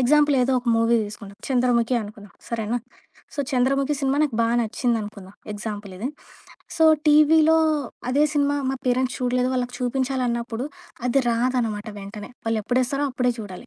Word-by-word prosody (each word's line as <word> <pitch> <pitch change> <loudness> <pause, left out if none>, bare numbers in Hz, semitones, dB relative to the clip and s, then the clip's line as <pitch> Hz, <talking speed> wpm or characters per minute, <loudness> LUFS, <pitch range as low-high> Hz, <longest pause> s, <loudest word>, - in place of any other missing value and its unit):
Example 290 +3 +4
ఏదో 260 +2 +2
ఒక 245 - -10
movie 230 +1 +3
దీసుకుంటా. 205 -1 -9
'Chandramukhi' 245 -2 +2
అనుకుందాం. 205 -1 -10 0.2
సరేనా! 230 0 -2 0.6
సో, - - -15
'చంద్రముఖి' 275 +2 +1
సినిమా 275 0 +1
నాకు 270 -7 0
బా 230 - +3
నచ్చిందనుకుందాం. 215 -4 -2 0.2
ఎగ్జాంపుల్ 205 -2 -6
ఇది 235 +8 -3 0.7
సో, 320 - +4 0.2
టీవీలో 310 +1 +6 0.5
అదే 280 +4 +3
సినిమా 285 -1 +2
మా 270 - -1
పేరెంట్స్ 255 +1 +1
చూడలేదు. 250 0 +1
వాళ్ళకి 250 -1 -2
చూపించాలన్నప్పుడు 250 -2 -1 0.4
అది 260 +3 +3
రాదనమాట 230 -3 0
వెంటనే. 205 +1 -8 0.2
వాళ్ళు 225 -1 +1
ఎప్పుడేస్తారో 255 +5 0
అప్పుడే 250 -1 +1
చూడాలి. 205 +2 -8
245 Hz, 140 wpm, -23 LUFS, 225-270 Hz, 0.7 s, టీవీలో